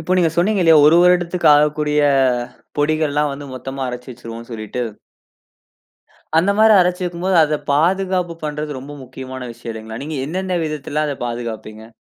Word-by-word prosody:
இப்ப, 185 Hz, -, 0 dB
நீங்க 165 Hz, -3 st, +3 dB
சொன்னீங்கலயா, 175 Hz, -3 st, +4 dB
1 165 Hz, +3 st, +6 dB
வருடத்திற்கு 180 Hz, -1 st, +3 dB
ஆகக்கூடிய 150 Hz, 0 st, +1 dB, 0.8 s
பொடிகள்லா 150 Hz, 0 st, +1 dB
வந்து, 140 Hz, +1 st, -8 dB
மொத்தமா 135 Hz, +1 st, -6 dB
அரைச்சு 125 Hz, +1 st, -7 dB
வச்சுருவோன்னு 115 Hz, 0 st, -10 dB
சொல்லிட்டு 110 Hz, +2 st, -4 dB, 1.6 s
அந்த 180 Hz, +5 st, +3 dB
மாரி, 220 Hz, 0 st, +6 dB
அரைச்சு 180 Hz, +1 st, 0 dB
வக்கும் 175 Hz, 0 st, -5 dB
போது, 190 Hz, -2 st, +2 dB
அத 150 Hz, 0 st, -1 dB, 0.2 s
பாதுகாப்பு 180 Hz, +2 st, +1 dB
பண்றது, 150 Hz, 0 st, -4 dB
ரொம்ப 145 Hz, +2 st, -10 dB
முக்கியமான 130 Hz, 0 st, -8 dB
விஷயம் 115 Hz, 0 st, -8 dB
இல்லங்கிளா? 110 Hz, +1 st, -8 dB
நீங்க 155 Hz, -1 st, -5 dB
என்னன 185 Hz, +2 st, -2 dB
விதத்தில, 150 Hz, -1 st, -3 dB
அத 145 Hz, -, -2 dB
பாதுகாப்பீங்க? 115 Hz, -2 st, -7 dB
150 Hz, 145 wpm, -19 LUFS, 125-175 Hz, 1.6 s, 1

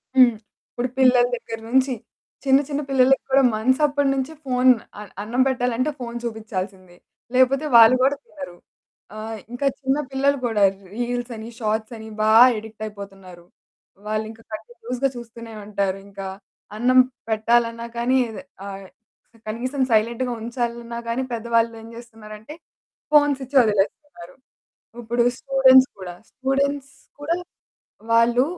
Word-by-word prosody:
హ్మ్. 250 Hz, -3 st, +6 dB, 0.3 s
ఇప్పుడు 245 Hz, +1 st, -3 dB
పిల్లల 250 Hz, -2 st, +5 dB
దగ్గర 230 Hz, -1 st, -7 dB
నుంచి 260 Hz, +1 st, +2 dB, 0.5 s
చిన్న, 270 Hz, 0 st, +5 dB
చిన్న 290 Hz, 0 st, -2 dB
పిల్లలకి 265 Hz, 0 st, +3 dB
కూడా 270 Hz, +1 st, +5 dB
మంత్స్ 260 Hz, +6 st, +1 dB
అప్పటి 285 Hz, -1 st, +1 dB
నుంచి 270 Hz, +3 st, -3 dB
ఫోను, 255 Hz, -1 st, +4 dB, 0.3 s
అ -, -, -7 dB, 0.2 s
అన్నం 235 Hz, +5 st, -1 dB
పెట్టాలంటే 250 Hz, +2 st, 0 dB
ఫోన్ 235 Hz, -1 st, -6 dB
చూపిచాల్సిందే. 195 Hz, -5 st, -6 dB, 0.4 s
లేపోతే 265 Hz, +3 st, +3 dB
వాళ్ళు 230 Hz, +1 st, +9 dB
కూడా 275 Hz, +2 st, +3 dB
తినరు. 275 Hz, -, -10 dB, 0.6 s
ఆహ్, 220 Hz, +1 st, -6 dB, 0.2 s
ఇంకా 245 Hz, +3 st, -3 dB
చిన్న 270 Hz, 0 st, 0 dB
పిల్లలు 280 Hz, +1 st, +1 dB
కూడా 220 Hz, -4 st, +1 dB, 0.3 s
రీల్సని, 240 Hz, -1 st, -4 dB
షార్ట్సని 220 Hz, 0 st, -3 dB
బా 215 Hz, 0 st, +3 dB, 0.3 s
ఎడిక్ట్ 220 Hz, 0 st, -9 dB
అయిపోతున్నారు. 195 Hz, -4 st, -11 dB, 0.6 s
వాళ్ళింకా 220 Hz, +1 st, -4 dB
కంటిన్యూయస్‌గా 240 Hz, +4 st, -4 dB
చూస్తూనే 230 Hz, -1 st, -10 dB
ఉంటారు. 200 Hz, -2 st, -1 dB
ఇంకా 195 Hz, -1 st, -7 dB, 0.5 s
అన్నం 255 Hz, +3 st, +4 dB, 0.3 s
పెట్టాలన్నా 230 Hz, +1 st, +1 dB
కానీ 245 Hz, +2 st, +2 dB, 0.5 s
ఆహ్, 195 Hz, -1 st, -8 dB, 0.6 s
కనీసం 255 Hz, +5 st, -3 dB
సైలెంట్‌గా 235 Hz, +3 st, +1 dB
ఉంచాలన్న 235 Hz, 0 st, -4 dB
గాని, 240 Hz, +3 st, -1 dB
పెద్దవాళ్ళు 230 Hz, 0 st, +1 dB
ఏమి 230 Hz, +1 st, -12 dB
చేస్తున్నారంటే, 220 Hz, +2 st, -11 dB, 0.6 s
ఫోన్స్ 290 Hz, -2 st, +4 dB
ఇచ్చి 275 Hz, +3 st, -6 dB
వదిలేస్తున్నారు. 205 Hz, -, -2 dB, 0.7 s
ఇప్పుడు 235 Hz, +1 st, +1 dB
స్టూడెంట్స్ 265 Hz, -1 st, +5 dB
కూడా, 180 Hz, -2 st, -7 dB, 0.2 s
స్టూడెంట్స్ 275 Hz, +1 st, -1 dB, 0.3 s
కూడా 320 Hz, +4 st, -1 dB, 0.8 s
వాళ్ళు 235 Hz, +2 st, +4 dB
235 Hz, 120 wpm, -22 LUFS, 220-260 Hz, 0.8 s, వాళ్ళు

